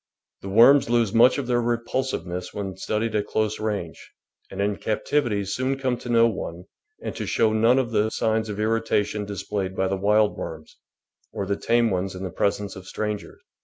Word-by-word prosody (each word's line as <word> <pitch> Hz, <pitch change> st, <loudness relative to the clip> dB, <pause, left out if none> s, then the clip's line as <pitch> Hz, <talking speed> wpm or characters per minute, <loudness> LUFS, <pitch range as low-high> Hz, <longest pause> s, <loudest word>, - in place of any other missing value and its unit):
The 95 Hz, -, -6 dB
worms 120 Hz, +7 st, +6 dB
lose 115 Hz, -3 st, +2 dB
much 120 Hz, +4 st, +6 dB
of 140 Hz, -, -2 dB
their 120 Hz, -1 st, +1 dB
repulsive 120 Hz, -2 st, -1 dB
ness 90 Hz, 0 st, -6 dB
when 95 Hz, -2 st, -4 dB
studied 110 Hz, +3 st, -2 dB
at 105 Hz, -1 st, 0 dB
close 110 Hz, -1 st, -1 dB
range, 105 Hz, -6 st, -4 dB, 0.4 s
and 95 Hz, -, -8 dB
in 100 Hz, 0 st, 0 dB
captivity 110 Hz, -2 st, 0 dB
soon 130 Hz, +7 st, -1 dB
come 130 Hz, -2 st, 0 dB
to 120 Hz, -, -9 dB
know 115 Hz, -1 st, +5 dB
one 90 Hz, -6 st, -5 dB, 0.4 s
and -, -, -4 dB
to -, -, -4 dB
show 110 Hz, -1 st, +2 dB
none 115 Hz, +4 st, +4 dB
of 125 Hz, -3 st, 0 dB
the 110 Hz, 0 st, +2 dB
signs 110 Hz, 0 st, 0 dB
of 105 Hz, 0 st, -5 dB
irritation 110 Hz, -1 st, 0 dB
displayed 100 Hz, -1 st, -4 dB
by 95 Hz, -, +1 dB
the 95 Hz, +1 st, -1 dB
wild 105 Hz, +2 st, +3 dB
worms, 80 Hz, -1 st, -8 dB, 0.6 s
or 100 Hz, -, -3 dB
the 100 Hz, +1 st, 0 dB
tame 115 Hz, +2 st, +2 dB
ones 95 Hz, +1 st, -2 dB
in 90 Hz, -, -6 dB
the 95 Hz, -, -4 dB
presence 100 Hz, +1 st, -1 dB
of 95 Hz, -1 st, -11 dB
strangers. 105 Hz, -1 st, -5 dB
105 Hz, 195 wpm, -24 LUFS, 100-115 Hz, 0.6 s, worms